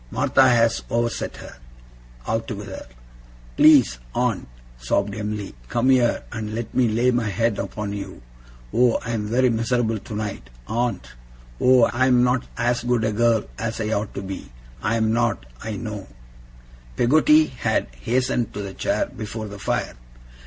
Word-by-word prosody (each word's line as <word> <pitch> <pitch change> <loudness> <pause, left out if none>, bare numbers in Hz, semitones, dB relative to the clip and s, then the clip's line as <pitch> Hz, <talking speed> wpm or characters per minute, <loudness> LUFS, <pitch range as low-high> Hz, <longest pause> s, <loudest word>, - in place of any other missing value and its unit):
'Martha 130 - +4
has 115 -1 +3
overset 115 0 -1
her, - - -11 0.7
altogether.' 110 - -4 0.7
'Please, 130 - +6 0.2
aunt,' - - 0 0.3
sobbed 100 +12 0
Em'ly, 105 -1 -4 0.2
'come 125 +3 +2
here, 125 -2 +3
and 110 -1 -4
let 115 -1 -5
me 130 -2 +3
lay 120 +3 +2
my 120 -2 0
head 115 +1 0
upon 100 +1 -4
you. 100 -10 -7 0.5
Oh, 120 -1 +4
I 115 - -3
am 105 -3 -2
very 125 +3 +3
miserable 115 -1 0
tonight, 105 - -5 0.2
aunt! 115 - -2 0.5
Oh, 125 -1 +5
I 130 +3 +2
am 125 -1 +4
not 125 0 +1
as 120 0 0
good 120 -2 +1
a 110 - +1
girl 115 0 +3 0.2
as 115 0 -3
I 110 0 -2
ought 105 -1 -2
to 100 - -4
be. 95 -7 -7 0.3
I 115 - 0
am 110 -1 +1
not, 120 - 0 0.2
I 110 - -4
know!' 105 -3 -6 0.9
Peggotty 150 +4 +5
had 130 -5 -1
hastened 120 - -1
to 105 - -4
the 95 -1 -6
chair - - 0
before 110 0 -6
the 100 0 -9
fire. - - -1
115 Hz, 155 wpm, -23 LUFS, 105-120 Hz, 0.9 s, Please